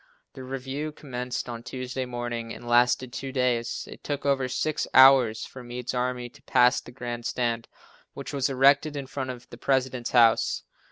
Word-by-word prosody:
The 130 - -9
review 135 +3 -4
commenced 125 -5 -5
on 120 -1 -6
Tuesday 130 +1 -5
morning 120 -2 -4
and 120 - -9
lasted 120 +1 +3
two 135 -1 -5
days. 125 -3 -1
It - - -12
took 145 -1 -4
over 135 -2 +2
six 150 +4 -1
hours 130 -4 +7
for 130 - -11
Meade's 125 +1 -5
army 125 0 -2
to 130 +3 -18
pass 125 0 +3
the 120 - -13
grand 120 -1 -6
stand, 115 -1 -1 0.5
which - - -7
was 140 -1 0
erected 140 +3 +4
in 140 - -4
front 130 0 -5
of 125 -1 -8
the 120 - -11
President's 130 -2 0
house. 115 -2 +4
125 Hz, 175 wpm, -26 LUFS, 120-135 Hz, 0.5 s, hours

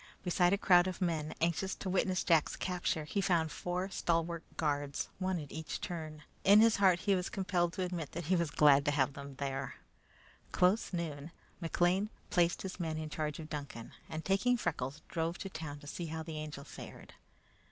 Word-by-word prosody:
Besides 180 +1 +3
a - - -4
crowd 180 -2 +5
of 185 - -4
people 160 -4 -1
anxious 170 +3 +1
to - - -6
witness 185 0 +1
Jack's 165 -4 +3
capture, 180 -4 -1
he 195 +7 -1
found 170 -4 +2
four 180 +2 -3
stalwart 170 -1 0 0.2
guards, 145 -2 -1
one 185 -2 0
at 145 -2 -8
each 160 0 -5
turn. 155 -3 -6 0.2
In 200 +2 +8
his 225 0 +6
heart 185 -3 +4
he 200 - +2
was 180 -1 0
compelled 180 -3 0
to 185 - -2
admit 175 -5 -4
that 170 0 -4
he 185 +4 +3
was 170 -3 +1
glad 145 -1 +6
to - - +3
have 140 -2 +2
them 140 0 -8
there. 135 -1 -3 0.8
Close 185 +5 +3
noon, 160 -4 -4 0.3
McLean 175 +4 +2 0.2
placed 175 -2 +2
his 190 0 -6
men 160 -2 -2
in 155 -1 -5
charge 150 -2 -2
of 160 - -7
Duncan, 140 -6 -6 0.2
and 160 0 -5
taking 205 +6 +3
Freckles, 140 - -3
drove 165 0 -2
to 195 - -5
town 155 -3 -6
to - - -12
see 165 +3 -5
how 160 0 -4
the 160 -1 -5
Angel 150 -2 -6
fared. - - -10
170 Hz, 195 wpm, -33 LUFS, 150-185 Hz, 0.8 s, In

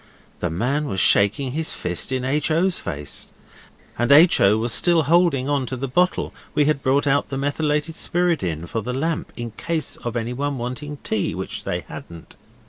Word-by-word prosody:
The 90 - -1
man 125 - -1
was 95 -2 -2
shaking 105 +9 +3
his 160 +3 -1
fist 90 +7 -2
in 130 -1 -1
H. 145 +4 0
O.'s 170 +3 +2
face, 70 -1 -5 0.7
and 120 +2 +2
H. 160 +5 +7
O. 100 +2 +5
was 115 +1 0
still 170 -2 +4
holding 160 -4 +3
on 140 -3 0
to 130 - -4
the 135 +2 -3
bottle 180 +8 +1 0.2
we 150 - +4
had 150 -2 +1
brought 135 +2 +2
out 140 0 +1
the 135 - -3
methylated 150 +2 -1
spirit 175 -1 +1
in 85 -2 -3
for 115 +6 -3
the 125 +4 -4
lamp, 160 +4 -2
in 120 -1 -5
case 160 +6 -3
of 120 0 -5
anyone 125 +5 -2
wanting 130 +5 -5
tea, 110 -3 -1
which - - -5
they - - -2
hadn't. 85 -1 -11
135 Hz, 190 wpm, -22 LUFS, 115-150 Hz, 0.7 s, H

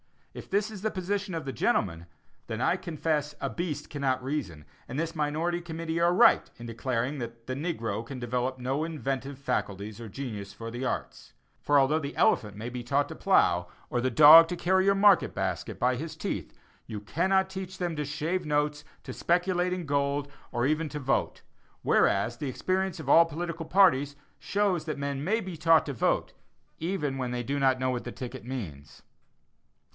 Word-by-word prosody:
If - - -10
this 205 +2 0
is 205 -3 -8
the 220 - 0
position 195 -1 -3
of 160 -3 -4
the 135 - -4
gentlemen, 85 -4 0 0.4
then 110 - -4
I 170 - +3
confess 155 -4 -2
a - - -1
beast 155 -4 -4
cannot 135 -3 -1
reason, 115 - -4 0.2
and 130 - -5
this 165 +1 -2
minority 160 +3 -1
committee 165 -1 -4
are 170 +1 +4
right 180 - +5
in 120 - -10
declaring 125 +4 -2
that 115 -1 -7
"the 130 - -3
negro 115 - -3
can 130 +3 -8
develop 125 +1 -2
no 130 +4 -1
inventive 135 -4 -3
faculties 105 -5 -3
or 115 - -7
genius 105 -5 -6
for 115 +2 -7
the 120 +3 -4
arts." - - -4 0.3
For 145 - +3
although 140 +3 +4
the 140 -2 -6
elephant 105 -4 +2
may 115 +3 -5
be 125 0 -5
taught 140 +4 0
to - - -7
plow, 90 - +3 0.2
or 120 - 0
the 130 - +1
dog 155 +6 +9
to 180 - -3
carry 185 +2 +2
your 200 0 +4
market 200 -1 +4
basket - - -3
by 125 +1 +1
his 155 +3 -6
teeth, - - -5 0.3
you 105 -3 -6
cannot 190 - +1
teach 190 -1 -6
them 175 -3 -2
to 150 - -1
shave 160 +5 -2
notes, 150 0 0 0.2
to - - -7
speculate 180 +1 +1
in 180 -2 -4
gold, 140 0 0 0.2
or 120 - 0
even 155 +3 +1
to 150 - -5
vote; 135 -1 -1 0.4
whereas, 115 +4 +2
the 145 - -3
experience 185 +5 -1
of 145 -4 -6
all 165 +3 +8
political 165 0 -5
parties 145 -8 +4 0.2
shows 195 -6 0
that 155 -4 -3
men 140 0 -3
may 220 +7 +1
be 185 -4 -7
taught 165 0 +4
to 140 - -4
vote, 120 - 0 0.5
even 160 -6 -2
when 125 -1 -2
they 120 0 -2
do 140 +4 -2
not 130 -1 +3
know 130 0 0
what 125 -1 -3
the - - -5
ticket 125 -1 -7
means. 95 - -7
145 Hz, 190 wpm, -28 LUFS, 125-170 Hz, 0.5 s, dog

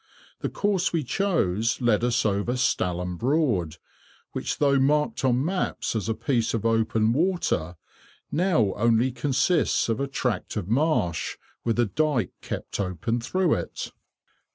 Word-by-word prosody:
The - - -2
course 200 -3 0
we 165 -3 0
chose 120 - 0
led 120 -3 +2
us 120 -1 +1
over 100 +3 +1
Stalham 90 -8 0
Broad, 115 - +1 0.5
which, - - -3
though 140 -2 +3
marked 150 +2 +1
on 130 +1 +2
maps 180 -8 -1
as 110 0 -2
a 110 - 0
piece 115 -3 0
of 115 - -3
open 115 0 +2
water, 155 - 0 0.6
now 160 - +2
only 115 +3 +2
consists 145 +3 +1
of 115 - 0
a 140 - -1
tract 125 -5 -2
of 95 -4 -3
marsh, 115 - 0 0.3
with 115 -1 0
a 120 - +4
dyke 135 - 0
kept - - -5
open 100 +5 -1
through 180 +7 +1
it. - - -4
120 Hz, 145 wpm, -25 LUFS, 105-150 Hz, 0.6 s, a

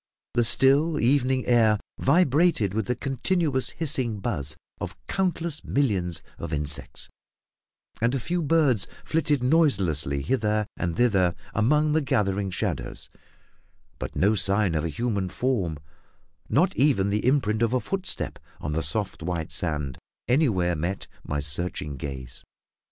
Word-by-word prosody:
The 120 - +3
still, 140 +7 +5
evening 130 0 +2
air 115 -3 +4 0.2
vibrated 145 - +3
with 110 -1 -1
the 125 - 0
continuous 140 +1 0
hissing 130 -9 0
buzz 80 - -3 0.2
of - - -6
countless 170 -4 -1
millions 90 - 0 0.2
of - - -5
insects, 75 -1 -3 0.9
and 120 +3 +2
a - - 0
few 175 +8 -2
birds 145 -9 +2 0.2
flitted 150 -4 +1
noiselessly 95 - +1
hither 105 - 0
and 85 -2 -3
thither 95 -8 +3 0.2
among 150 +8 +2
the 160 - +3
gathering 100 -7 0
shadows; - - -4 0.9
but - - -6
no 100 +3 +3
sign 100 -2 +1
of 80 -1 0
a 85 - -1
human 100 +1 -2
form, 95 - -1 0.7
not 175 +6 +2
even 125 -9 +2
the 105 0 0
imprint 120 -5 +1
of 115 -1 +2
a 130 - +2
footstep 190 +6 -3 0.2
on 75 - -4
the 80 - 0
soft 95 +7 -1
white 85 -1 -3
sand, 75 -6 -3 0.3
anywhere 110 - +2
met 85 +5 -3 0.2
my 75 - -3
searching 75 0 -1
gaze. 65 -3 -7
110 Hz, 135 wpm, -25 LUFS, 90-140 Hz, 0.9 s, still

